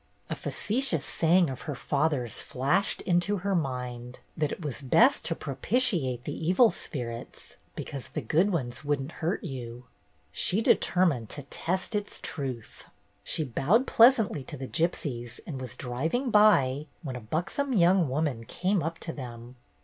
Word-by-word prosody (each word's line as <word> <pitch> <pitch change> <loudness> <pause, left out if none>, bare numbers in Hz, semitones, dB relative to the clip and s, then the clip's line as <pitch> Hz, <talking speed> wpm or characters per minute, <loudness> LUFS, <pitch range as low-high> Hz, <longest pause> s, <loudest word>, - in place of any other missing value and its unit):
A - - 0
facetious 215 - -1
saying 165 +9 +3
of 130 - -7
her 145 - -2
father's 140 -3 -1
flashed 135 +9 0
into 180 +3 +1
her 200 - +1
mind, 125 -6 -3 0.2
that 150 -2 0
it - - -6
was 145 0 -3
best 235 - +4
to 165 - -1
propitiate 140 - +1
the - - -4
evil 185 +8 +4
spirits 120 -4 -7 0.2
because 135 -3 -6
the - - -4
good 165 - +2
ones 130 -6 -2
would 145 -1 0
n't 135 +4 -6
hurt 170 +4 -2
you. 125 -2 -7 0.5
She 180 - +2
determined 170 - +2
to 145 - -7
test 185 - -3
its 205 -1 -3
truth. 130 -7 -5 0.4
She 155 - 0
bowed 155 - +2
pleasantly 225 - +5
to 145 - -7
the 130 0 -6
gypsies 130 -8 -2
and 135 -6 -6
was 130 - -6
driving 160 - -2
by, 150 -10 +4 0.2
when 135 -4 -5
a 125 - -6
buxom 180 - -2
young 180 - +4
woman 135 -4 -1
came 185 - 0
up 165 +1 -3
to 165 - -4
them. 120 -2 -9
150 Hz, 155 wpm, -28 LUFS, 130-185 Hz, 0.5 s, pleasantly